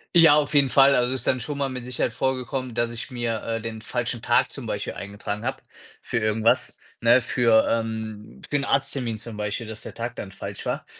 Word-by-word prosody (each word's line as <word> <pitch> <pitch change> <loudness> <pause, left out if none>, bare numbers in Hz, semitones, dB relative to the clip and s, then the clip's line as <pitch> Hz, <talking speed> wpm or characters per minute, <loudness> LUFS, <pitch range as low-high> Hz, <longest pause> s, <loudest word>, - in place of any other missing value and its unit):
Ja, 160 -3 +8
auf 150 -1 +1
jeden 140 -2 +5
Fall. 135 +1 +6
Also, 125 -1 +2
es 130 - -3
ist - - -5
dann 130 - +2
schon 140 +4 -5
mal 140 -1 0
mit 125 -2 -6
Sicherheit 125 -2 -1
vorgekommen, 130 0 -2
dass 120 0 0
ich 120 +3 -7
mir, 120 -3 -2
äh, 115 0 -2
den 110 0 -6
falschen 120 +1 -3
Tag - - +2
zum - - -7
Beispiel - - -3
eingetragen 100 +1 -5
habe 130 +2 -3 0.4
für - - -2
irgendwas, 110 +1 +1 0.2
ne? 120 +2 +6
Für 115 -3 +4
ähm, 110 -2 -3
für 145 - +1
'n 140 - -2
Arzttermin 135 -4 0
zum 110 0 -7
Beispiel, 105 +3 -3
dass 110 0 -4
der - - -8
Tag 120 +1 -4
dann 95 - -6
falsch - - -7
war. - - -2
120 Hz, 220 wpm, -25 LUFS, 110-130 Hz, 0.4 s, Ja